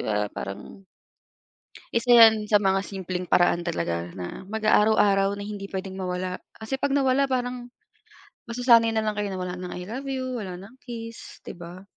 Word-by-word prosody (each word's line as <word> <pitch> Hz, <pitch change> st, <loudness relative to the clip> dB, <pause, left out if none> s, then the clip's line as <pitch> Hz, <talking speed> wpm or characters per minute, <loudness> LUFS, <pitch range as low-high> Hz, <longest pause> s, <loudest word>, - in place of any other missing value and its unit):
ba 105 Hz, -1 st, -1 dB
parang 100 Hz, -, -7 dB, 1.1 s
Isa 235 Hz, +1 st, +2 dB
'yan 225 Hz, -2 st, +8 dB
sa 210 Hz, -1 st, +3 dB
mga 195 Hz, -1 st, +2 dB
simpleng 185 Hz, -2 st, -4 dB
paraan 175 Hz, -1 st, +3 dB
talaga 85 Hz, -, -2 dB
na 90 Hz, -, -7 dB
mag-a 215 Hz, +2 st, +2 dB
araw-araw 200 Hz, -2 st, +3 dB
na 205 Hz, -, -6 dB
hindi 200 Hz, -1 st, -6 dB
puwedeng 190 Hz, 0 st, -5 dB
mawala 180 Hz, -1 st, -3 dB, 0.2 s
kasi 220 Hz, +5 st, -3 dB
'pag 275 Hz, +1 st, -1 dB
nawala, 275 Hz, 0 st, +3 dB
parang 245 Hz, -2 st, -3 dB, 0.8 s
masasanay 235 Hz, -1 st, +5 dB
na 220 Hz, -1 st, 0 dB
lang 210 Hz, -, 0 dB
kayo 205 Hz, -1 st, -2 dB
na 190 Hz, -, -4 dB
wala 180 Hz, 0 st, -4 dB
ng 180 Hz, 0 st, -7 dB
I 180 Hz, -, -6 dB
love 260 Hz, +6 st, -6 dB
you 255 Hz, -1 st, -3 dB
wala 185 Hz, -5 st, -6 dB
ng 200 Hz, +7 st, -13 dB
kiss, 230 Hz, -2 st, -9 dB
di -, -, -6 dB
ba? 175 Hz, +1 st, -10 dB
205 Hz, 175 wpm, -25 LUFS, 180-235 Hz, 1.1 s, yan